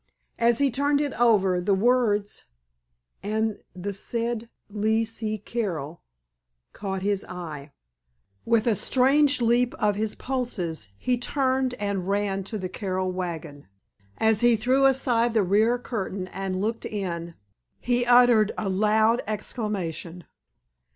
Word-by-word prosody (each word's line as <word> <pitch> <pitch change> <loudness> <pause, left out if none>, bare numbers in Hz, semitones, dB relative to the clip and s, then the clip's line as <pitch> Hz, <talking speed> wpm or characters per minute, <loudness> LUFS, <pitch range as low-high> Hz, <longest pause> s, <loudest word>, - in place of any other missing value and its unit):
As 235 0 +4
he 280 0 +2
turned 285 +3 +1
it 290 -1 -1
over 195 -6 +3
the 195 +2 +2
words: 210 -2 +1 0.8
"and 215 +2 -1 0.2
the 195 +3 -4
said 230 +3 -3 0.2
Lee 220 +2 0
C. 220 -1 -3
Carroll——" 175 -9 -4 0.7
caught 195 -2 -4
his 200 -1 0
eye. 155 -5 -8 0.7
With 230 -1 +2
a 230 -3 +3
strange 275 +5 +3
leap 240 +1 +2
of 210 -1 +1
his 215 +1 -2
pulses 185 - -3
he 250 - 0
turned 260 0 0
and 200 -4 -3
ran 200 -1 0
to 215 - -4
the 185 -2 -4
Carroll 185 -1 -3
wagon. 165 -5 -6 0.5
As 220 -1 +3
he 240 -1 +5
threw 255 +5 +3
aside 240 -3 +2
the 215 - +4
rear 215 +6 +3
curtain 200 -6 -4
and 190 -1 -3
looked 220 +3 -2
in 170 -5 -4 0.4
he 245 0 +1
uttered 240 -3 +5
a 205 - -2
loud 215 +4 +3
exclamation. 195 -6 -4
215 Hz, 130 wpm, -25 LUFS, 190-240 Hz, 0.8 s, he